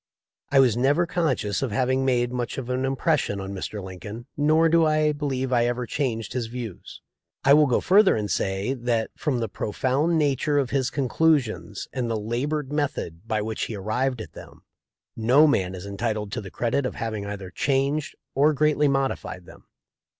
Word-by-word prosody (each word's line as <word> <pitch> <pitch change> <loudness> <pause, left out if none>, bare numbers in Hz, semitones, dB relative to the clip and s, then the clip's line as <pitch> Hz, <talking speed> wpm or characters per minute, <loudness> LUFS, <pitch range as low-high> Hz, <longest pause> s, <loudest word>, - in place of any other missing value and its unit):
I 140 - +5
was 125 -5 +5
never 140 +8 +2
conscious 150 - -1
of 135 -4 -1
having 130 +4 +1
made 120 -2 +1
much 125 -1 -3
of 130 -2 -4
an 130 +1 0
impression 135 -5 0
on 95 0 -5
Mr. 100 +1 -5
Lin 95 -1 -8
coln, 110 +5 -8
nor 155 +3 +4
do 165 0 +4
I 155 -1 +3
believe 135 -3 -2
I 120 -1 +3
ever 120 0 -2
changed 115 -6 -2
his 120 -2 -2
views. 115 -5 -8 0.4
I 140 - +6
will 150 0 +6
go 125 - +2
further 195 +1 +5
and 105 -1 -2
say, 95 +6 -1
that, 120 -3 -1
from 145 -5 -1
the 115 -1 -1
profound 130 +11 0
nature 145 0 +1
of 135 -3 0
his 135 -2 +1
conclusions 135 -7 0
and 125 -3 -2
the 110 -1 -1
labored 130 +6 -2
method 115 - -3
by 110 -2 0
which 110 0 -3
he 110 - -5
arrived 115 +5 -1
at - - -10
them, - - -13 0.5
no 125 +7 +5
man 95 -11 +1
is 90 +1 -8
entitled 105 0 -3
to 120 - -3
the 95 - -8
credit 120 +8 -1
of - - -7
having 110 -3 -4
either 100 -2 -6
changed 140 +4 0 0.2
or 145 +3 +4
greatly 150 0 +2
modi 135 -1 +1
fied 90 -1 -9
them. - - -16
125 Hz, 190 wpm, -25 LUFS, 110-145 Hz, 0.5 s, I